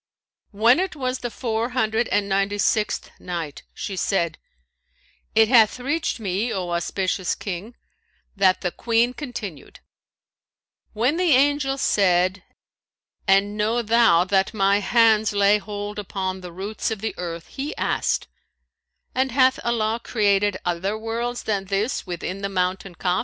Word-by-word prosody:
When 230 +7 +4
it 375 -3 -2
was 255 -2 -2
the 240 - -4
Four 230 -1 -2
Hundred 220 0 +1
and 205 -1 0
Ninety 195 +1 0
sixth 210 +1 0
Night, 170 -5 -5
She 195 - -5
said, 170 -4 0 1.0
It 220 0 +6
hath 230 -1 +5
reached 290 +2 -1
me, 205 +3 -1
O 180 -3 -3
auspicious 185 +2 -1
King, 200 +4 -6 0.6
that 190 -2 +3
the 180 - -1
Queen 235 +4 +1
continued: 240 - -7 1.1
"When 245 +8 +1
the 355 -4 +3
angel 275 0 +2
said, 185 -5 +2 0.9
'And 195 +2 +3
know 220 +3 0
thou 225 -6 +4
that 195 +3 +1
my 200 0 +3
hands 220 -1 +3
lay 200 +1 +4
hold 205 0 -6
upon 190 -2 -4
the 180 -1 -8
roots 195 +5 -3
of 220 -3 -4
the 220 - -2
earth,' 170 -2 -5
he 280 +3 -5
asked, - - 0 0.9
'And 260 0 0
hath 260 +1 +3
Allah 230 -1 0
created 205 -3 +1
other 180 +4 -1
worlds 235 +2 -3
than 200 -3 -1
this 200 +4 -1
within 180 +2 -5
the 200 - -2
mountain 185 -1 -2
Kaf?' 180 +1 0
205 Hz, 140 wpm, -23 LUFS, 190-235 Hz, 1.1 s, It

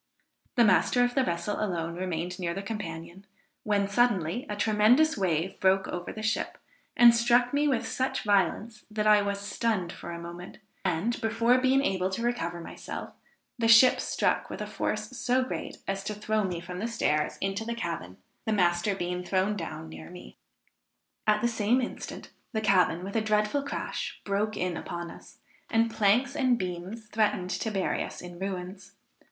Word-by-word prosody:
The 240 - +5
master 220 +5 +4
of 245 0 +1
the 265 - +3
vessel 190 +3 -2
alone 170 -4 -2
remained 175 0 -3
near 170 -2 -2
the 195 - -4
companion; 185 -3 -6 0.4
when 205 -2 +1
suddenly 210 -1 +1
a 210 - -2
tremendous 220 +9 +4
wave 180 -2 -1
broke 190 0 +3
over 175 0 -5
the 215 - -7
ship, 220 +2 -1 0.4
and 240 -1 +9
struck 240 +2 +3
me 295 +1 +2
with 240 -5 0
such 260 +1 -1
violence, 210 +2 +1
that 215 0 -2
I 210 -1 +6
was 200 0 -2
stunned 200 -2 -1
for - - -9
a 170 - -5
moment, 170 +1 -9 0.3
and, 190 +7 0
before 230 +2 +3
being 265 +2 +3
able 185 -5 0
to 210 +5 -3
recover 175 -8 -1
myself, 165 - -7 0.5
the 230 - +2
ship 230 +3 +7
struck - - 0
with - - -6
a - - -3
force - - -3
so 255 0 +1
great 255 - -5
as 195 0 -2
to 210 - -3
throw 215 +1 0
me 180 -3 -2
from 180 +1 -7
the 225 - -1
stairs 150 -10 0
into 195 +2 -2
the 235 +1 -3
cabin, 165 - -5 0.3
the 220 - +2
master 175 0 +2
being 180 -1 -3
thrown 190 +3 +1
down 165 - -6
near 80 0 -10
me. 60 - -11 0.9
At 210 0 +4
the 240 - +3
same 230 +1 +2
instant, 250 - -6 0.2
the 220 - +1
cabin, 185 -4 +3
with 200 +3 -6
a 225 - +3
dreadful 215 +5 +1
crash, 280 - -4
broke 210 +2 -1
in 180 -1 -1
upon 170 -1 -5
us, - - -14 0.3
and 230 0 +2
planks 230 +7 +2
and 255 -4 +3
beams 185 +4 -5
threatened 210 -4 0
to 200 +5 -2
bury 195 -3 -1
us - - -8
in 175 -1 -9
ruins. 190 0 -5
205 Hz, 180 wpm, -28 LUFS, 180-230 Hz, 0.9 s, and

